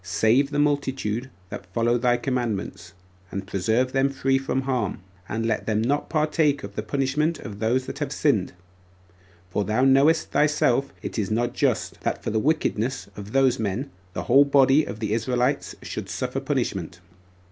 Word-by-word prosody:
Save 125 +6 +2
this 145 0 -1
multitude 135 -5 0 0.2
that 90 - -8
follow 115 +1 +2
thy 120 0 +3
commandments, 115 -9 -3 0.4
and 100 -1 -5
preserve 110 +7 0
them 135 +1 +2
free 135 0 +1
from 135 0 -1
harm, 130 -6 -1 0.3
and 115 +2 -2
let 115 - -1
them 110 -1 +1
not 135 +6 0
partake 150 -2 +1
of 100 - -7
the 105 - -3
punishment 140 +7 0
of 105 -6 -8
those 120 +4 +1
that - - -7
have - - -2
sinned; - - +1 1.0
for 105 - 0
thou 110 +5 +1
knowest 140 +5 +4
thyself 140 -3 +2
it - - -4
is 100 - -1
not 120 +2 0
just, - - -1
that - - -2
for - - -2
the 110 - +1
wickedness 130 - 0
of 105 0 -8
those 135 -2 +3
men 110 +6 -2 0.2
the - - -3
whole 135 +4 +6
body 140 +1 +4
of 110 - -7
the 105 -1 -1
Israelites 125 +4 0
should - - -6
suffer - - -2
punishment." 85 - -2
125 Hz, 170 wpm, -24 LUFS, 110-135 Hz, 1.0 s, whole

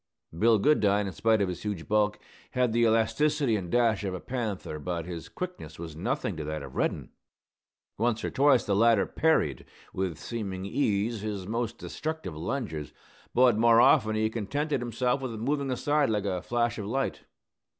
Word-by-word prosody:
Bill 110 +5 +4
Goodine, 105 -5 +3
in 95 - -4
spite 110 +5 +2
of - - 0
his 90 -2 -5
huge 100 -6 -4
bulk, 105 0 +2 0.4
had 125 -3 +1
the 120 - +2
elasticity 130 +4 +2
and 95 -4 -3
dash 115 -2 +2
of 95 -2 -2
a - - -5
panther; 110 -11 -4
but 85 +1 -3
his 85 -2 -7
quickness 180 - -7
was 80 -2 -7
nothing 110 - -2
to 80 - -4
that 75 0 -4
of - - -9
Reddin. - - -1 0.9
Once 115 -1 +1
or - - -2
twice 135 -2 +4
the 100 - +1
latter 115 -1 +4
parried, 155 - +1 0.3
with 95 -4 -2
seeming 95 -3 -5
ease, 105 -1 0
his 105 -3 -4
most 115 +2 -2
destructive 160 - -5
lunges, 80 - -4 0.4
but 125 -3 +5
more 115 0 +6
often 110 -4 +5
he 110 0 +1
contented 140 +6 -2
himself 125 +2 0
with 130 -3 -4
moving 135 +5 -1
aside 145 +2 +1
like 105 -2 0
a 90 -3 -1
flash 120 -1 -1
of 100 - -4
light. 135 +5 -2
110 Hz, 175 wpm, -28 LUFS, 95-125 Hz, 0.9 s, more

